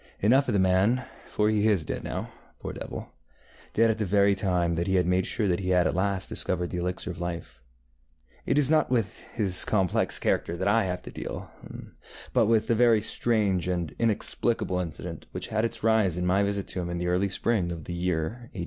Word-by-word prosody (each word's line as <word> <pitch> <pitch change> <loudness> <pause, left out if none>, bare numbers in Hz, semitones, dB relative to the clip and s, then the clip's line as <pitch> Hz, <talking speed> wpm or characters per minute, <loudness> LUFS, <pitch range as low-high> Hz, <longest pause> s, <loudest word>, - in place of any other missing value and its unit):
Enough 130 +7 +3
of - - 0
the 100 - +2
man, 95 +7 +2 0.2
for 105 - 0
he 105 0 +2
is 100 -8 +2
dead - - -4
now, - - -5 0.3
poor - - -6
devil, - - -7 0.6
dead 115 0 +4
at 110 - -4
the - - +1
very 100 +1 +3
time 90 -4 0
that 85 +1 -2
he 95 - +1
had 90 -2 +3
made 90 +1 +1
sure 105 - -1
that 90 -2 +1
he 95 -1 -3
had 90 -1 +3
at - - +1
last 95 0 -1
discovered 90 -1 -2
the 90 - -3
elixir 90 +1 -3
of 85 0 -9
life. 85 -7 -6 0.9
It 140 - +2
is 150 0 +4
not 155 -1 +3
with 115 -5 -1 0.2
his 100 -5 +3
complex 95 -5 +2
character 85 - 0
that 95 +2 -1
I 105 +1 +3
have 90 -1 -4
to - - -9
deal, - - -7 0.8
but - - +3
with 115 -1 +3
the - - +1
very 115 -1 +4
strange 105 -4 0
and 85 -3 -2
inexplicable 115 -3 +1
incident 80 -4 -6
which - - -4
had 110 0 0
its 115 - -2
rise 110 -6 +2
in 90 - -1
my 95 +2 +2
visit 100 -1 -1
to 90 - -2
him 85 - -4
in 85 - -3
the 90 - -3
early 90 +3 +1
spring 95 -2 0
of 85 -2 -6
the 85 - -6
year 90 +7 -2
ŌĆÖ82. - - -6
95 Hz, 220 wpm, -27 LUFS, 90-110 Hz, 0.9 s, dead